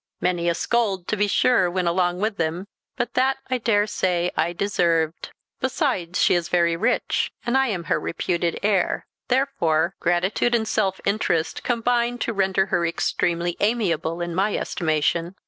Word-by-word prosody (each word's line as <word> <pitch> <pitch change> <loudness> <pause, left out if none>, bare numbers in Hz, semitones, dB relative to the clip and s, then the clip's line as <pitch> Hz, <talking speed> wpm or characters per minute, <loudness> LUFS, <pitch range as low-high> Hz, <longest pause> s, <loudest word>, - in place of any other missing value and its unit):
Many 175 -1 0
a 170 - 0
scold, 200 -6 0
to - - +1
be 205 0 +1
sure, 200 -3 +3
went 180 0 -1
along 175 +1 +1
with 215 -1 -1
them; 165 +3 -2 0.3
but 240 - -2
that, 265 +1 +2
I 255 - +1
daresay, 205 -6 +1
I 160 +2 +1
deserved. 170 -4 0 0.3
Besides, 255 - -1
she - - +4
is 175 -1 0
very 170 -1 +2
rich, 165 - 0
and 240 +2 0
I 265 0 +3
am 190 -7 -2
her 165 - 0
reputed 170 0 -2
heir; 200 -3 +1 0.2
therefore 190 - +1
gratitude 185 +7 +1
and 220 -2 0
self 195 -3 0
interest 195 -5 0
combine 240 0 0
to 235 - -2
render 190 -1 +1
her 175 - +2
extremely 170 0 -1
amiable 180 -7 0
in 175 0 -3
my 195 +4 +1
estimation." 165 +2 -1
185 Hz, 160 wpm, -23 LUFS, 170-220 Hz, 0.3 s, she